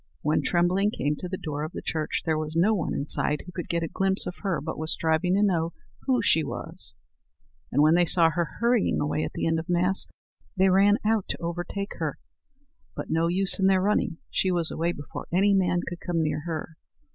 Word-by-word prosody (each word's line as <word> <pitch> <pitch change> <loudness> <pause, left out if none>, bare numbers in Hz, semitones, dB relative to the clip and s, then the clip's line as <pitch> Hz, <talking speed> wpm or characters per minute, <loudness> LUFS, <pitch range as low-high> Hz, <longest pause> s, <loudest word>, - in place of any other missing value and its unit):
When 150 +1 +2
Trembling 180 +3 +2
came 150 -8 -1
to 180 - -5
the 185 - -3
door 150 -4 -4
of 155 - -5
the - - -5
church 155 -2 -2
there 160 -2 +1
was 155 0 -5
no 185 +7 +4
one 185 -7 -1
inside 150 +1 +1
who 180 - -9
could 175 -1 -6
get 170 0 0
a - - -1
glimpse 190 +3 +2
of 180 - -6
her 190 -5 -1
but 160 +2 -5
was 155 0 +2
striving 165 +3 +1
to 200 - +3
know 170 -4 +1 0.3
who 255 -2 +2
she 160 - +3
was: 140 - -6 0.8
and 145 - +3
when 155 +1 +5
they 175 0 +3
saw 165 -1 +4
her 170 0 -3
hurrying 235 -1 +2
away 150 +1 -1
at - - -4
the - - -2
end 165 0 +1
of 165 +3 -8
Mass, 180 +2 +3 0.5
they 190 +1 +4
ran 200 +2 +5
out 220 -2 +2
to - - -1
overtake 175 +4 -4
her. - - -2 0.8
But - - -6
no 165 +1 +2
use 190 +2 +1
in 190 - +4
their 190 -1 +4
running; 200 -4 +1
she 190 - +1
was 175 -3 0
away 170 +2 0
before 145 -4 -8
any 195 +4 +3
man 180 -2 +2
could 175 -1 -5
come 170 -2 -1
near 155 -1 -1
her. 160 -1 -5
175 Hz, 220 wpm, -26 LUFS, 160-190 Hz, 0.8 s, when